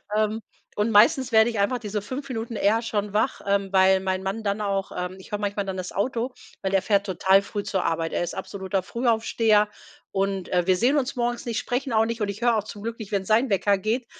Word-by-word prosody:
Ähm, 215 +1 0 0.3
und 210 +2 +1
meistens 235 +4 +5
werde 220 +1 +5
ich 225 -3 -3
einfach 200 +6 +2
diese 210 -2 -3
5 260 +7 -6
Minuten 230 -1 -4
eher 215 +3 +2
schon 210 -3 -2
wach, 215 +5 +1
ähm, 200 -1 +1
weil 190 0 +5
mein 190 0 -2
Mann 195 +4 -3
dann 200 0 -1
auch 195 -1 -1
ähm, 180 +1 -4
ich 190 - -14
höre 210 - -2
manchmal 205 0 -2
dann 190 -1 -4
das 180 -1 -5
Auto, 245 +4 -1 0.3
weil 190 - -1
der 195 -1 +3
fährt 200 -1 +1
total 190 0 +3
früh 205 0 -5
zur 190 -2 -1
Arbeit. 165 0 -1
Er - - 0
ist 175 - -4
absoluter 190 0 -3
Frühaufsteher 225 -2 +2 0.4
und, 195 -1 -1
äh, 180 -1 +1
wir 185 - +5
sehen 255 +8 +3
uns 275 -1 -1
morgens 240 -1 -2
nicht, 235 -1 -1
sprechen 250 +1 -2
auch 220 0 +4
nicht 230 0 -4
und 210 - +1
ich 200 +3 -6
höre 240 -1 +3
auch 210 - -1
zum 205 -1 -9
Glück 230 +1 -5
nicht, 220 -2 -8
wenn 195 -1 +1
sein 225 +6 +3
Wecker 200 0 +2
geht, 225 +6 -1
210 Hz, 240 wpm, -25 LUFS, 195-230 Hz, 0.4 s, meistens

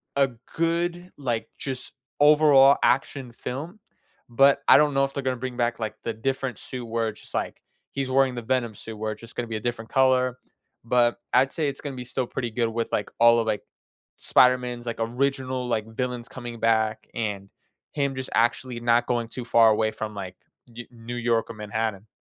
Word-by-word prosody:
a 140 -1 +4 0.3
good, 170 +2 -1
like, 120 -5 -2
just 130 -2 -5 0.3
overall 145 -2 +7
action 130 -1 +1
film. 150 - -6 0.5
But 135 +4 +4
I - - +9
don't 150 -1 +3
know 135 0 +3
if 135 - -7
they're 140 - -4
gonna 130 0 0
bring 130 0 -5
back, 120 -1 0
like, 110 -1 -3
the 115 - -2
different 130 0 -2
suit 125 -2 -7
where 115 0 -1
it's 105 - -11
just, - - -15
like, - - -3 0.3
he's 135 -1 -3
wearing 130 -1 +3
the 120 - -4
Venom 120 -2 -1
suit 110 +1 -9
where 110 0 -2
it's 105 - -15
just 115 0 -12
gonna 120 - -3
be 110 - -4
a - - -2
different 115 -1 -4
color, 130 -1 +3 0.5
but 120 0 +2
I'd 130 +2 +4
say 155 -3 0
it's 140 -1 -4
gonna 140 -2 -5
be 125 - -6
still 125 0 -2
pretty 120 -2 -4
good 115 +1 0
with, 115 +1 -3
like, 105 - -1
all 115 0 +6
of, 115 - -1
like, 105 -2 -1 0.5
Spider-Man's, 125 -1 +3
like, 115 -1 -4
original, 130 +2 -1
like, 110 -3 -1
villains 125 +1 -4
coming 120 -2 -8
back 110 -1 +1
and 100 -3 -3 0.4
him 140 -2 -1
just 130 0 -5
actually 120 +1 +1
not 120 0 +3
going 120 -2 -1
too 125 0 -7
far 115 -1 +5
away 110 0 +2
from, 110 0 -5
like, 95 -2 -6 0.3
Ne 120 0 -10
New 120 0 -8
York 115 -1 0
or - - -6
Manhattan. 105 -1 -3
120 Hz, 200 wpm, -25 LUFS, 115-130 Hz, 0.5 s, I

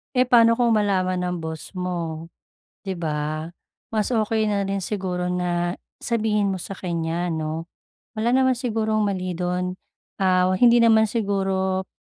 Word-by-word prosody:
Eh, 250 0 +3
paano 230 -1 +5
kung 235 -2 +4
malaman 185 -3 +1
ng 180 0 -1
boss 160 -1 -6
mo, 170 -3 -4 0.6
'di 190 -3 -4
ba. 155 0 -2 0.4
Mas 215 +1 -1
okey 220 -1 +1
na 200 -2 0
rin 195 -1 -2
siguro 180 -3 -2
na, 175 0 -1 0.2
sabihin 210 -3 +1
mo 190 - -3
sa 195 - -6
kanya 170 -1 -2
'no, 160 0 -3 0.5
wala 230 +2 +1
naman 260 0 +4
sigurong 220 -4 0
mali 185 -2 -2
dun, 180 +1 -2 0.4
ah, 185 -1 +3
hindi 240 -1 +6
naman 220 -1 +5
siguro, 195 -3 -1
190 Hz, 145 wpm, -23 LUFS, 180-220 Hz, 0.6 s, hindi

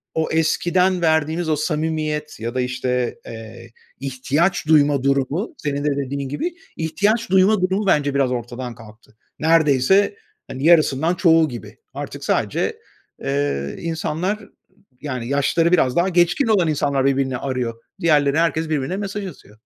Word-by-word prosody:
o 160 0 0
eskiden 175 +3 +2
verdiğimiz 160 +1 +1
o 155 - +2
samimiyet 155 -1 -2
ya 115 +2 -4
da, 130 - +1
işte, 125 0 -1
eee, 115 +1 -10 0.3
ihtiyaç 140 +6 -1
duyma 145 -3 +4
durumu, 140 - 0
senin 145 -1 -3
de 145 -1 0
dediğin 140 0 -3
gibi, 340 - -3 0.2
ihtiyaç 205 +8 0
duyma 190 +2 +4
durumu 190 +3 0
bence 145 -6 +2
biraz 135 -2 +2
ortadan 120 0 -5
kalktı. 110 -1 -16 0.2
Neredeyse, 160 +5 +3 0.3
hani, 130 - -6
yarısından 160 0 +4
çoğu 165 -3 +4
gibi. 120 -3 -9 0.2
Artık - - -7
sadece, - - -1 0.4
eee, 70 0 -1
insanlar, 165 +4 -2 0.6
yani 130 -5 -4
yaşları 145 +4 +2
biraz 130 -8 +3
daha 175 +2 +2
geçkin 180 +8 +2
olan 200 -6 +3
insanlar 140 -3 0
birbirini 135 -1 +1
arıyor. 125 -3 -2 0.3
Diğerleri, 150 -2 +3
herkes 165 -1 0
birbirine 155 +4 -1
mesaj 200 0 -4
atıyor. 110 - -14
150 Hz, 140 wpm, -21 LUFS, 130-170 Hz, 0.6 s, duyma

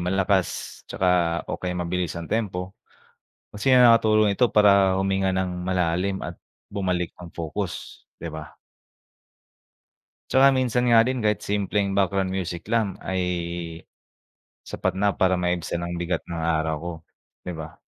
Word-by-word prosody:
malakas 95 +1 +1 0.4
tsaka 85 -2 +1
o - - -3
kaya 90 -1 -3
mabilis 90 -1 -2
ang 85 -1 -6
tempo 95 -4 -2 0.8
kasi 105 +6 0
nga 125 - +7
nakakatulong 110 -3 +4
ito 125 -2 +3
para 100 -2 +5
huminga 95 0 +1
nang 90 -1 -2
malalim 90 +1 0
at 85 0 -6 0.3
bumalik 90 -4 -2
ang 85 -1 -11
focus, 85 +3 -5 0.2
di 85 - -5
ba? 80 -2 -9 1.7
Tsaka 135 +1 +6
minsan 125 -2 +1
nga 115 0 +6
din 130 -3 -1
kahit 105 -1 +2
simpleng 100 -1 -1
background 95 -1 +1
music 90 -2 -4
lang 110 -3 0
ay 95 -1 -2 1.4
sapat 95 0 -2
na 100 0 +2
para 95 -1 +2
maibsan 90 -1 -1
ang 85 0 -4
bigat 85 +1 -2
ng 85 -1 -5
araw 80 -1 0
ko, 85 0 -4 0.5
di 90 - -4
ba? 80 -1 -9
95 Hz, 140 wpm, -24 LUFS, 85-100 Hz, 1.7 s, nga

